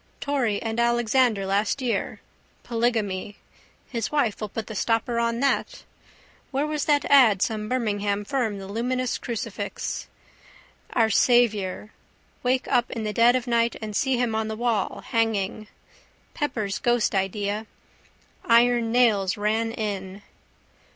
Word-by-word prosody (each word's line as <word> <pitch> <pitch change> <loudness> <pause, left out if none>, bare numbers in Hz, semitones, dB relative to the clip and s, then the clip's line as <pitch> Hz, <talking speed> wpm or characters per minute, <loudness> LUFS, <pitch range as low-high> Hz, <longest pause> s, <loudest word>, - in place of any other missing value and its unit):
Torry 255 -8 0
and 225 0 -2
Alexander 235 -2 +2
last 200 +6 0
year. 250 -3 -2 0.4
Polygamy. 220 -5 -1 0.5
His 230 -3 -3
wife 255 -9 0
will 215 - -3
put 225 +2 -5
the 220 - -8
stopper 230 +3 0
on 235 +1 0
that. 275 - 0 0.7
Where 275 +2 0
was 300 -1 -2
that 290 -1 +2
ad 230 -9 +5
some 215 -2 -2
Birmingham 205 -4 -1
firm 230 -5 -1
the 195 -1 -8
luminous 250 +4 -2
crucifix. 235 -3 -4 0.9
Our 225 -2 +3
Saviour. 215 -4 +2 0.5
Wake 255 +1 0
up 245 -2 +2
in 225 - -4
the 210 -1 -2
dead 235 +3 +5
of 255 -1 -1
night 235 -1 +1
and 215 -2 -6
see 265 +2 +1
him 240 -2 0
on 220 0 -1
the 220 - -4
wall, 230 -4 -1
hanging. 215 -2 -1 0.7
Pepper's 220 -9 -2
ghost 240 -2 +1
idea. 205 +2 -1 0.8
Iron 235 0 +4
Nails 215 -6 +3
Ran 220 +2 0
In. 200 -3 -5
225 Hz, 135 wpm, -25 LUFS, 210-245 Hz, 0.9 s, ad